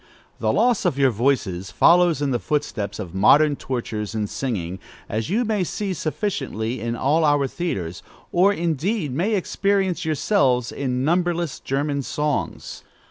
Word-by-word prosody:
The - - +1
loss 245 -4 +2
of 135 - 0
your 135 -2 +4
voices 105 -7 0
follows 170 -3 +4
in 140 - 0
the 120 - 0
footsteps 105 -4 -2
of 90 -5 -7
modern 145 +10 +5
tortures 115 -5 -4
in 110 -1 0
singing, 95 -6 -3 0.3
as 110 +5 -3
you 230 +6 +1
may 210 -3 0
see 195 +2 -3
sufficiently 155 - -3
in 115 +1 -2
all 150 +7 +2
our 145 -2 +3
theatres, 100 - -4 0.3
or, 185 +3 +4
indeed, 170 - -1
may 190 - +1
experience 195 -2 0
yourselves 140 - +1
in 130 -1 -2
numberless 175 -1 0
German 140 +1 -1
songs. 150 +2 -3
145 Hz, 145 wpm, -23 LUFS, 115-175 Hz, 0.3 s, modern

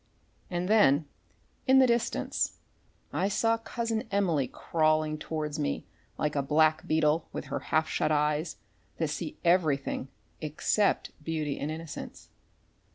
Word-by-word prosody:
And 175 0 -2
then, 165 -9 +5 0.6
in 265 +1 +6
the 265 - +7
distance, 235 -2 0 0.6
I 190 - +1
saw 225 +3 +2
Cousin 225 -1 -3
Emily 170 -9 +1
crawling 155 +1 +1
towards 155 -1 -3
me 145 - -1 0.3
like 150 -1 -1
a 140 - +2
black 155 +4 +3
beetle 155 0 +2
with - - -5
her - - 0
half 155 0 +3
shut 155 - 0
eyes 150 +2 +1 0.4
that 160 -2 0
see 155 +1 -4
everything 155 -7 +2 0.3
except 155 +7 +1
beauty 155 -3 -2
and 145 - -2
innocence. 160 0 -7
155 Hz, 130 wpm, -29 LUFS, 150-185 Hz, 0.6 s, the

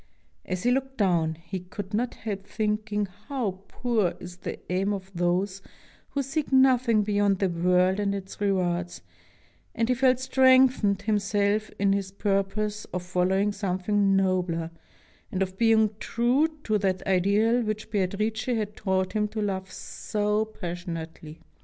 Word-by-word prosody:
As 185 -1 -3
he 245 - +3
looked 265 +1 -1
down, 170 -6 +2
he 170 +3 -6
could 190 +2 -8
not 240 +3 -1
help 200 -3 -5
thinking 210 -1 -1 0.2
how 225 -10 -2
poor 220 -8 0
is 180 0 -9
the - - -5
aim 195 +3 +1
of 190 -1 -6
those 185 +3 0 0.5
who 280 - -1
seek 280 +2 -3
nothing 255 -4 +4
beyond 205 -1 +2
the 195 0 +1
world 180 +2 +2
and 200 -1 0
its 195 +1 -8
rewards, 180 -3 -1 0.7
and 230 0 +1
he - - +5
felt 255 0 +3
strengthened 260 -6 +4
him 210 0 +2
self 205 +1 0
in 200 0 +2
his 195 -1 -1
purpose 205 +1 -1
of 180 0 -5
following 185 +3 +1
something 195 0 +1
nobler, 180 -4 0 0.6
and 190 0 +1
of 185 0 -6
being 220 -2 +4
true 245 +6 +2 0.2
to 215 -1 +1
that 190 -2 -1
ideal 200 +6 +3
which 215 -1 -4
Beatrice 210 +2 -1
had 220 -5 -1
taught 190 -1 -1
him 210 -1 +1
to 215 +1 -6
love 190 -2 -2
so 210 +1 -2
passionately. 170 -5 -7
200 Hz, 150 wpm, -26 LUFS, 185-220 Hz, 0.7 s, he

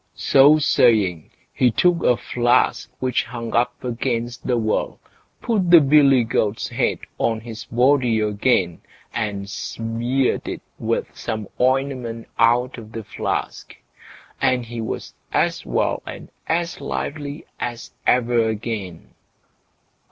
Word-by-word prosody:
So 145 +3 +6
saying, 105 - +2 0.2
he 125 - +3
took 175 +8 +2
a 120 - +3
flask 120 0 +1
which 130 -2 0
hung 115 -1 -6
up 120 +1 0
against 120 0 -3
the 125 -2 +2
wall, 110 -2 -1 0.4
put 200 -6 +1
the 170 -1 +9
billy 140 -3 +5
goat's 110 -1 -1
head - - 0 0.2
on 115 -1 0
his 110 -1 -8
body 125 -1 +2
again, 105 -4 +1 0.3
and 100 -3 -3
smeared 115 +5 -2
it - - -5 0.2
with - - -2
some 110 -2 -4
ointment 130 -3 0
out 120 +2 +3
of 110 -1 -12
the 115 - -5
flask, - - -4 0.7
and 125 -2 +2
he 115 0 -6
was 110 - -5 0.2
as - - 0
well - - 0
and - - -9 0.2
as 170 -1 -1
lively 145 +1 -4
as 120 -1 -5 0.2
ever 120 -2 +3
again. 105 -6 -5
120 Hz, 125 wpm, -22 LUFS, 110-130 Hz, 0.7 s, the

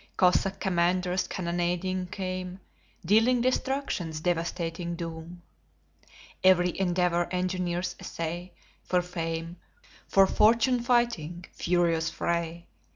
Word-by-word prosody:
Cossack 190 +1 +3
commanders 180 0 +1
cannonading 180 +1 -2
come, 185 0 -5 0.5
Dealing 225 +7 +4
destruction's 255 - -1
devastating 170 0 -2
doom. 170 +1 -7 1.0
Every 180 -2 +5
endeavor 175 -2 +1
engineers 180 -1 -2
essay, 170 +2 -5 0.3
For 180 -1 +1
fame, 165 -1 -4 0.5
for 195 0 +5
fortune 230 +5 +3
fighting 235 -9 0
furious 170 -2 +1
fray! 170 0 -2
180 Hz, 90 wpm, -28 LUFS, 170-185 Hz, 1.0 s, Every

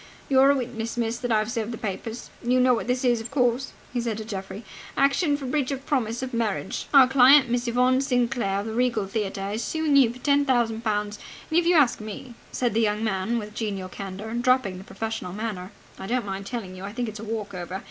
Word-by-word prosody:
"You're 270 0 +6
a 280 - +5
witness, 235 -3 -4
miss, 235 0 -1
that 245 -1 -2
I've 215 +1 +1
served 230 -2 -2
the 230 - -5
papers. 220 +3 -5
You 250 +1 +2
know 255 0 +5
what 235 - -2
this 250 +1 0
is, 240 -2 +3
of 225 - -7
course?" 255 -1 +1 0.2
he 245 - 0
said 230 -3 -2
to 220 - -6
Geoffrey. 195 0 -6 0.3
"Action 285 +2 +3
for 280 - -7
breach 260 0 0
of 275 -1 -4
promise 240 -3 -1
of 255 - -5
marriage. 220 -4 -2
Our 270 -3 +8
client, 265 0 +6
Miss 245 0 0
Yvonne 250 +2 +3
Sinclair, 240 -7 0
of - - -7
the 220 - -4
Regal 235 -3 +1
Theatre, 195 -1 -3
is 220 +3 -2
suing 315 -2 0
you 260 -5 +6
for 245 - -11
ten 285 +2 +2
thousand 235 -4 +1
pounds. 210 -1 -1 0.3
And, 325 - +5
if 345 - 0
you 350 - +5
ask 275 -8 +4
me," 220 +4 -8 0.2
said 245 -3 0
the 225 - +2
young 210 0 +1
man 215 +2 0
with 210 -2 -5
genial 200 -4 -3
candour, 200 +3 -7
dropping 240 -6 +1
the - - -10
professional 220 -4 -5
manner, 205 -3 -5 0.3
"I 190 - -6
don't 245 0 0
mind 195 0 -5
telling 205 -6 -5
you, 185 - -9
I 200 +1 -6
think 240 0 -2
it's 215 -1 -7
a - - -7
walk 215 -2 -4
over! 180 +1 -5
230 Hz, 235 wpm, -25 LUFS, 210-255 Hz, 0.3 s, Our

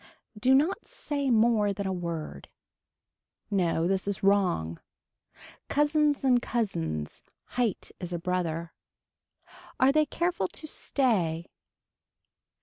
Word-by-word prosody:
Do 255 +5 +4
not 310 +8 +1
say 285 -2 -3
more 220 -3 +3
than 200 +1 -4
a 190 - -1
word. 165 - -5 1.0
No 170 -4 +1
this 190 +1 0
is 200 -1 -2
wrong. 180 - +2 0.9
Cousins 295 0 +2
and 250 -2 +4
cousins, 80 - -2 0.3
height 240 -5 -1
is 180 -2 -6
a 175 - -1
brother. 170 -1 -2 1.1
Are 260 +1 +6
they 305 +1 +3
careful 345 - 0
to 310 - -6
stay. 190 - 0
200 Hz, 110 wpm, -28 LUFS, 170-265 Hz, 1.1 s, Are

